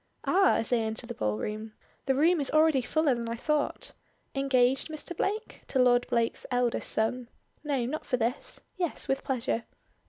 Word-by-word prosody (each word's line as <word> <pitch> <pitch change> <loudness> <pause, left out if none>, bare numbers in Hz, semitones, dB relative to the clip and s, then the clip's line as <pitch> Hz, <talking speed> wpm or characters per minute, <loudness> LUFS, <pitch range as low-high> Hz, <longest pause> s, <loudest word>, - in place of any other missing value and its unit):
Ah!" 385 +1 +4
as 225 - -1
they 245 -2 +2
enter 220 +2 -3
the 240 - -6
ballroom. 210 - -3 0.3
"The 265 - +3
room 325 +3 +4
is 275 - -1
already 310 -3 +4
fuller 305 +2 +2
than 235 -1 -3
I 230 - -2
thought. 300 +4 -1 0.4
Engaged, 265 -1 +2
Mr. 315 +2 -6
Blake?" 425 +6 -2
to - - -2
Lord 245 -1 +4
Blake's 230 -1 0
eldest 245 -1 0
son. 235 +2 -1 0.3
"No, 275 -5 0
not 305 +6 -4
for 250 - +1
this. 240 +3 -2 0.2
Yes, 350 -3 -1
with 270 0 0
pleasure." 245 -3 -1
255 Hz, 175 wpm, -29 LUFS, 235-300 Hz, 0.4 s, Ah